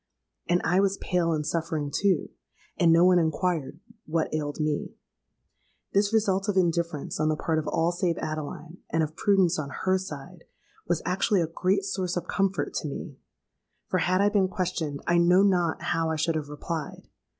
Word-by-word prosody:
And 175 Hz, 0 st, +3 dB
I 180 Hz, +3 st, +3 dB
was 195 Hz, 0 st, +2 dB
pale 175 Hz, -2 st, 0 dB
and 150 Hz, -2 st, -1 dB
suffering 160 Hz, -2 st, -2 dB
too; 195 Hz, -2 st, +1 dB, 0.5 s
and 170 Hz, -3 st, +4 dB
no 170 Hz, +2 st, +6 dB
one 180 Hz, -1 st, +6 dB
inquired 165 Hz, -2 st, -1 dB, 0.3 s
what 160 Hz, 0 st, -1 dB
ailed 150 Hz, -1 st, -3 dB
me. 150 Hz, -1 st, -2 dB, 1.0 s
This 200 Hz, +1 st, +3 dB
result 200 Hz, -2 st, +1 dB
of 195 Hz, -, 0 dB
indifference 170 Hz, -5 st, 0 dB
on 155 Hz, 0 st, +2 dB
the 155 Hz, -, +1 dB
part 160 Hz, +1 st, 0 dB
of 155 Hz, -, -5 dB
all 165 Hz, +1 st, +1 dB
save 175 Hz, -1 st, -1 dB
Adeline,—and 155 Hz, +2 st, -4 dB
of 155 Hz, 0 st, -4 dB
prudence 190 Hz, -4 st, +2 dB
on 140 Hz, -2 st, -4 dB
her 185 Hz, +6 st, 0 dB
side,—was 175 Hz, 0 st, -7 dB
actually 190 Hz, +1 st, +2 dB
a -, -, +1 dB
great 185 Hz, +4 st, 0 dB
source 185 Hz, -2 st, -2 dB
of 175 Hz, -, -3 dB
comfort 195 Hz, -1 st, 0 dB
to 155 Hz, -, -3 dB
me; 140 Hz, -, -7 dB, 0.7 s
for -, -, +1 dB
had 185 Hz, +2 st, +2 dB
I 205 Hz, -, +4 dB
been 200 Hz, -2 st, +2 dB
questioned, 170 Hz, -6 st, -3 dB
I 175 Hz, 0 st, +3 dB
know 180 Hz, +3 st, +5 dB
not 175 Hz, -5 st, +1 dB
how 165 Hz, 0 st, 0 dB
I 160 Hz, -, 0 dB
should 160 Hz, +2 st, 0 dB
have 155 Hz, -2 st, -3 dB
replied. 150 Hz, +1 st, -5 dB
170 Hz, 175 wpm, -27 LUFS, 155-185 Hz, 1.0 s, no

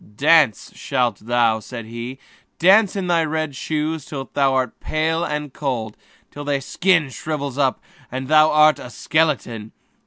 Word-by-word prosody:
"Dance 150 Hz, -5 st, +3 dB
you -, -, -21 dB
shall," 120 Hz, -3 st, 0 dB
said 115 Hz, +1 st, -8 dB
he, 120 Hz, +3 st, -7 dB, 0.4 s
"dance 195 Hz, +4 st, +5 dB
in 195 Hz, -2 st, -2 dB
your 165 Hz, -2 st, +2 dB
red 155 Hz, -2 st, -2 dB
shoes 155 Hz, +2 st, -2 dB
till 135 Hz, -1 st, -7 dB
you -, -, 0 dB
are 130 Hz, -2 st, +2 dB
pale 160 Hz, +2 st, -1 dB
and 150 Hz, -3 st, -4 dB
cold, 120 Hz, -7 st, -3 dB, 0.4 s
till 145 Hz, 0 st, -5 dB
your 140 Hz, -, +1 dB
skin 160 Hz, +1 st, +1 dB
shrivels 145 Hz, -2 st, -4 dB
up 135 Hz, -2 st, +1 dB, 0.3 s
and 130 Hz, +1 st, -4 dB
you 155 Hz, -, -1 dB
are 155 Hz, 0 st, +6 dB
a -, -, -9 dB
skeleton! 125 Hz, -8 st, -1 dB
145 Hz, 155 wpm, -21 LUFS, 125-155 Hz, 0.4 s, are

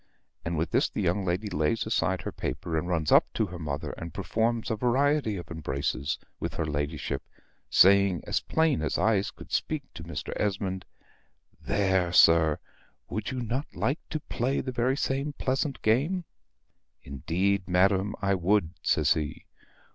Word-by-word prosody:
And 85 Hz, 0 st, -2 dB
with 80 Hz, +2 st, -1 dB
this -, -, +2 dB
the -, -, -5 dB
young 95 Hz, +4 st, +1 dB
lady 95 Hz, +4 st, -1 dB
lays 80 Hz, +5 st, 0 dB
aside -, -, 0 dB
her -, -, -3 dB
paper, 80 Hz, -, -4 dB
and 80 Hz, +2 st, -1 dB
runs 80 Hz, -4 st, 0 dB
up -, -, +5 dB
to 110 Hz, -, +2 dB
her 90 Hz, -2 st, -8 dB
mother 75 Hz, -3 st, -3 dB
and 85 Hz, 0 st, -6 dB
performs 115 Hz, +4 st, 0 dB
a -, -, +1 dB
variety 130 Hz, 0 st, +2 dB
of 85 Hz, -, -8 dB
embraces 70 Hz, -3 st, -2 dB, 0.2 s
with -, -, -4 dB
her 80 Hz, -, -1 dB
ladyship, 75 Hz, 0 st, -2 dB, 0.5 s
saying 100 Hz, -3 st, +5 dB
as -, -, 0 dB
plain 160 Hz, -, +1 dB
as 80 Hz, -, -1 dB
eyes 105 Hz, -2 st, +2 dB
could -, -, -13 dB
speak -, -, -1 dB
to -, -, -8 dB
Mr. -, -, -5 dB
Esmond 95 Hz, -2 st, -1 dB, 0.8 s
"There, 95 Hz, -3 st, +1 dB
sir: 80 Hz, -3 st, +6 dB, 0.5 s
would 110 Hz, -, -3 dB
not 125 Hz, +2 st, -2 dB
YOU -, -, -12 dB
like 140 Hz, +5 st, +1 dB
to 155 Hz, -, -2 dB
play 130 Hz, 0 st, -1 dB
the 130 Hz, -, -3 dB
very 125 Hz, +2 st, +1 dB
same 140 Hz, +2 st, -1 dB
pleasant 135 Hz, +1 st, -1 dB
game?" 145 Hz, +12 st, +2 dB, 0.8 s
"Indeed, 90 Hz, +8 st, -1 dB
madam, 95 Hz, +2 st, +2 dB
I 100 Hz, 0 st, +3 dB
would," 95 Hz, -1 st, +2 dB
says 75 Hz, -2 st, +3 dB
he. 75 Hz, -4 st, -4 dB
95 Hz, 160 wpm, -28 LUFS, 85-120 Hz, 0.8 s, sir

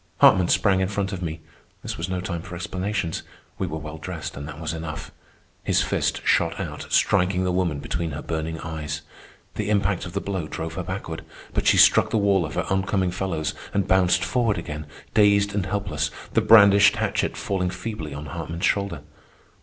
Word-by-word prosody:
Hartman 90 Hz, -2 st, +6 dB
sprang 95 Hz, +1 st, +3 dB
in 95 Hz, -, +1 dB
front 100 Hz, 0 st, -2 dB
of 95 Hz, -, -5 dB
me. 80 Hz, -2 st, -4 dB, 0.4 s
This -, -, -4 dB
was -, -, -4 dB
no 90 Hz, -1 st, -2 dB
time 85 Hz, -3 st, -4 dB
for 90 Hz, +1 st, -8 dB
explanations. 95 Hz, 0 st, -2 dB, 0.4 s
We 95 Hz, -, -1 dB
were 80 Hz, -1 st, -4 dB
well 75 Hz, +1 st, -7 dB
dressed, 80 Hz, -1 st, -6 dB
and 70 Hz, +1 st, -6 dB
that 75 Hz, 0 st, -8 dB
was 80 Hz, -1 st, -3 dB
enough. 80 Hz, -1 st, -6 dB, 0.5 s
His -, -, +2 dB
fist -, -, 0 dB
shot -, -, +2 dB
out, -, -, -5 dB
striking 95 Hz, -1 st, +3 dB
the 90 Hz, -, +1 dB
woman 90 Hz, -5 st, 0 dB
between 85 Hz, +3 st, -3 dB
her 75 Hz, 0 st, -6 dB
burning 80 Hz, 0 st, -3 dB
eyes. 75 Hz, -2 st, -5 dB, 0.5 s
The 105 Hz, -1 st, -3 dB
impact 100 Hz, -3 st, +1 dB
of 85 Hz, -, -10 dB
the 100 Hz, -, 0 dB
blow 95 Hz, -6 st, -3 dB
drove 80 Hz, +1 st, -5 dB
her 95 Hz, -, -3 dB
backward, 90 Hz, -3 st, -5 dB, 0.3 s
but -, -, 0 dB
she -, -, +5 dB
struck -, -, +6 dB
the -, -, +1 dB
wall 100 Hz, -5 st, +3 dB
of 75 Hz, -, -8 dB
her -, -, 0 dB
on 95 Hz, 0 st, +1 dB
coming 95 Hz, -2 st, 0 dB
fellows 90 Hz, -4 st, -2 dB, 0.2 s
and 100 Hz, -2 st, +1 dB
bounced 95 Hz, -1 st, +3 dB
forward 115 Hz, -5 st, +1 dB
again, 75 Hz, -3 st, -6 dB, 0.3 s
dazed 100 Hz, -1 st, +4 dB
and 100 Hz, -2 st, -1 dB
helpless, 90 Hz, -9 st, -1 dB, 0.2 s
the -, -, +4 dB
brandished 100 Hz, -2 st, +7 dB
hatchet -, -, -1 dB
falling 95 Hz, -2 st, -1 dB
feebly 90 Hz, -4 st, -5 dB
on 75 Hz, +2 st, -6 dB
Hartman's 80 Hz, +3 st, -4 dB
shoulder. 100 Hz, -7 st, 0 dB
90 Hz, 195 wpm, -24 LUFS, 80-100 Hz, 0.5 s, brandished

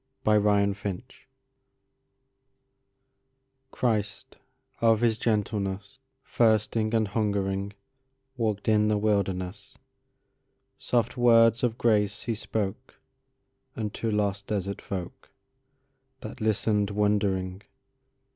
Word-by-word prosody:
In 110 Hz, -, +4 dB
the 105 Hz, -, +5 dB
Wilderness 100 Hz, +2 st, 0 dB, 2.6 s
CHRIST 105 Hz, -6 st, -2 dB, 0.4 s
of 115 Hz, -1 st, +4 dB
His 115 Hz, -2 st, +2 dB
gentlenessThirsting 110 Hz, +1 st, -1 dB
and 110 Hz, -2 st, +1 dB
hungering, 100 Hz, -2 st, -1 dB, 0.6 s
Walked 110 Hz, -4 st, -2 dB
in 105 Hz, -1 st, +4 dB
the 105 Hz, 0 st, +2 dB
wilderness; 100 Hz, -2 st, -2 dB, 1.0 s
Soft 120 Hz, +1 st, 0 dB
words 115 Hz, -1 st, +5 dB
of 120 Hz, -2 st, 0 dB
grace 105 Hz, -3 st, +1 dB
He 120 Hz, -, -2 dB
spokeUnto 105 Hz, -2 st, -3 dB, 1.3 s
lost 100 Hz, -1 st, -1 dB
desert 100 Hz, -2 st, -3 dB
folkThat 130 Hz, +6 st, -11 dB
listened 105 Hz, -1 st, +1 dB
wondering. 100 Hz, -2 st, 0 dB
105 Hz, 80 wpm, -27 LUFS, 100-115 Hz, 2.6 s, the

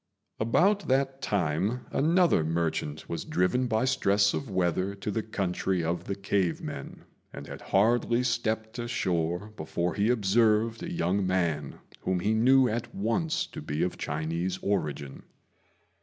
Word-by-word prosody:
About 180 Hz, -, +2 dB
that 135 Hz, +1 st, +1 dB
time 100 Hz, +6 st, 0 dB
another 165 Hz, -, +3 dB
merchant 80 Hz, -2 st, -2 dB
was -, -, -4 dB
driven 125 Hz, +9 st, +1 dB
by 110 Hz, +1 st, +1 dB
stress 100 Hz, -5 st, +3 dB
of 135 Hz, -, -3 dB
weather 95 Hz, +1 st, 0 dB
to 100 Hz, +1 st, -4 dB
the 110 Hz, -, -1 dB
country 95 Hz, -4 st, -1 dB
of 85 Hz, +2 st, -2 dB
the 100 Hz, -, -3 dB
cave 100 Hz, -3 st, 0 dB
men, -, -, -7 dB, 0.3 s
and 70 Hz, -, -8 dB
had -, -, -9 dB
hardly 120 Hz, +4 st, +2 dB
stepped 110 Hz, -1 st, -1 dB
ashore 95 Hz, -5 st, -1 dB
before 85 Hz, +2 st, -2 dB
he 105 Hz, +2 st, +1 dB
observed 110 Hz, 0 st, +2 dB
a -, -, -5 dB
young 90 Hz, +3 st, 0 dB
man 85 Hz, -6 st, 0 dB, 0.2 s
whom 95 Hz, -1 st, -1 dB
he 105 Hz, +5 st, +1 dB
knew 130 Hz, +4 st, +5 dB
at 115 Hz, 0 st, -3 dB
once 115 Hz, -, 0 dB
to -, -, -9 dB
be 75 Hz, +2 st, -2 dB
of 90 Hz, -, -1 dB
Chinese 80 Hz, +5 st, -2 dB
origin. 75 Hz, -8 st, -2 dB
100 Hz, 145 wpm, -28 LUFS, 85-115 Hz, 0.3 s, knew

